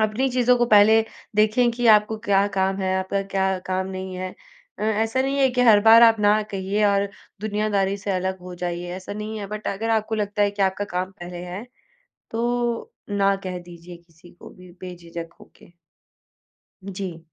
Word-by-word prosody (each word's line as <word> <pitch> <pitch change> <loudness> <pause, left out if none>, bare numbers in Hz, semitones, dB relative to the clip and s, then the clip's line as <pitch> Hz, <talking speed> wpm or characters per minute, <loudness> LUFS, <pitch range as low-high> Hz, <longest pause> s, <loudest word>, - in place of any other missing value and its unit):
अपनी 220 +5 +1
चीज़ों 250 0 +3
को 240 - +2
पहले 215 0 +6 0.4
देखें 215 +3 +3
कि 240 +1 -2
आपको 215 0 +5
क्या 200 -1 +3
काम 190 0 +1
है, 190 -1 -1
आपका 190 +1 -2
क्या 190 -1 -1
काम 185 0 -1
नहीं 190 0 -6
है? 185 0 -5 0.4
अ, - - -6
ऐसा 220 +4 0
नहीं 275 +1 -1
है 270 -1 +4
कि 250 0 -1
हर 220 -4 +6
बार 225 +2 +7
आप 225 -2 +6
ना 210 +1 +4
कहिए 195 +2 -1
और 200 0 +2 0.3
दुनियादारी 205 -2 0
से 200 0 -5
अलग 190 0 -2
हो 180 0 -9
जाइए, 175 0 -4
ऐसा 190 +2 -8
नहीं 215 +1 -5
है। 205 - -5
बट 210 +1 -7
अगर 225 +3 -3
आपको 220 0 0
लगता 205 -1 -1
है 205 - +2
कि 200 0 -2
आपका 190 +1 0
काम 185 -1 -3
पहले 175 0 -7
है, 185 +6 -7 0.7
तो 240 - -1 0.2
ना 200 -1 +2
कह 185 -1 -4
दीजिए 175 0 -12
किसी 170 0 -20
को 175 - -14
भी 180 -1 -15
बेझिझक 170 -2 -8
होके। - - -19 1.2
जी। 185 -3 -6
200 Hz, 185 wpm, -23 LUFS, 185-220 Hz, 1.2 s, बार